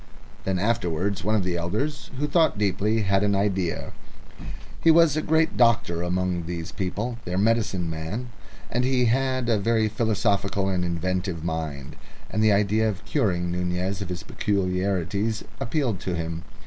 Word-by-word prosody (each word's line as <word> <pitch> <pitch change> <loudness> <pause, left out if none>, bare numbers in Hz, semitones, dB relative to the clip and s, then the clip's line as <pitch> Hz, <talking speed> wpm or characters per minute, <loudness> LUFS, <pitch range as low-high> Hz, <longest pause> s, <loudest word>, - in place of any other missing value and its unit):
Then 95 -1 0
afterwards 100 -2 0
one 110 +3 +2
of 105 - +2
the 90 -1 -1
elders, 110 - -2
who 150 +2 0
thought 160 - +3
deeply, 105 +2 +1
had 95 0 +2
an 100 -1 +2
idea. 95 -3 -1 0.9
He 165 - +6
was 165 -2 +6
the 155 - 0
great 160 +1 +2
doctor 110 -8 +3
among 90 -1 -1
these 85 0 -4
people, 110 +5 -3
their 90 +1 -3
medicine 105 -4 +1
man, 80 +10 -4 0.4
and 125 +2 +1
he 130 -1 +2
had 130 +1 +1
a 110 -3 +2
very 110 +1 +2
philosophical 100 -3 0
and 90 -2 0
inventive 90 0 -2
mind, 75 -4 -4 0.3
and 110 +3 +1
the 110 - +5
idea 105 +2 +3
of 105 0 -6
curing 90 -4 0
Nunez 90 +2 -2
of 95 - -4
his 90 -1 -4
peculiarities 100 +2 -1 0.2
appealed 125 - 0
to 90 -1 -3
him. 85 0 -4
100 Hz, 160 wpm, -25 LUFS, 90-115 Hz, 0.9 s, He